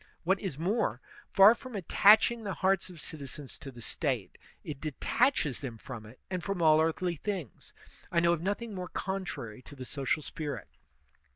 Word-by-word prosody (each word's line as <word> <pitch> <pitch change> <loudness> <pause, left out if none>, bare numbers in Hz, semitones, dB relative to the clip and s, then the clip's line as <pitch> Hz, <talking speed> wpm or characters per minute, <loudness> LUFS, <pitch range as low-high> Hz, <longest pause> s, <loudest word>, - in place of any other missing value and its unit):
What 190 +3 +2
is 185 -9 -4
more, 195 +9 0 0.3
far 195 +2 +8
from 250 0 -9
attaching 215 +5 +5
the 200 -2 -3
hearts 190 -1 +1
of 175 -3 -11
citizens 145 -3 -8
to 140 - -8
the 120 -3 -11
State, 130 - -2 0.2
it 145 -3 -6
detaches 160 - +1
them 125 -5 -6
from 115 -3 -8
it 115 +4 -15
and 185 -2 -3
from 195 -2 -2
all 155 -1 +6
earthly 165 +2 0
things. 180 - -5 0.4
I 170 - +3
know 170 0 +4
of 165 - -2
nothing 205 +4 -2
more 180 -2 -5
contrary 180 - -4
to 145 - -13
the 130 -2 -7
social 140 +3 -1
spirit. 145 -9 -5
170 Hz, 175 wpm, -31 LUFS, 140-195 Hz, 0.4 s, far